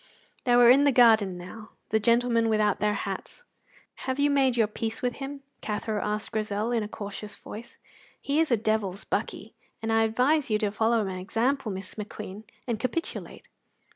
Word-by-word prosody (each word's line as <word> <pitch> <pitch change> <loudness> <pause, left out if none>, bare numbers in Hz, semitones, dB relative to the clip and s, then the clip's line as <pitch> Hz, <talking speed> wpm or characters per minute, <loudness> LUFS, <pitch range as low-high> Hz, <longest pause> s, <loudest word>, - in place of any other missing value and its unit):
They 245 -1 +4
were 240 0 +8
in 275 +3 +6
the 285 - +5
garden 220 -7 +5
now, 210 +5 -10 0.2
the 220 - +2
gentlemen 235 0 +3
without 215 -2 +2
their 210 0 +1
hats. - - -5 0.7
"Have 260 - 0
you 290 0 +3
made 265 -3 +3
your 225 - +5
peace 225 +2 -5
with 245 -1 -1
him?" 275 0 -6 0.2
Cathro 210 0 -2
asked 210 +1 -3
Grizel, 215 0 -1
in 235 -2 +1
a 210 - -3
cautious 205 0 -7
voice. 235 +4 -10 0.4
"He 285 +2 0
is 325 - +2
a 235 - +3
devil's 210 -3 -1
buckie, - - -3 0.3
and 225 0 -1
I 225 - +4
advise 250 +7 +2
you 215 - +3
to 210 -2 -1
follow 225 +1 +2
my 185 -1 -4
example, 230 +6 0
Miss 190 0 -5
McQueen, 210 0 -8 0.2
and 235 -4 -2
capitulate. 255 +8 -4
225 Hz, 180 wpm, -27 LUFS, 210-245 Hz, 0.7 s, were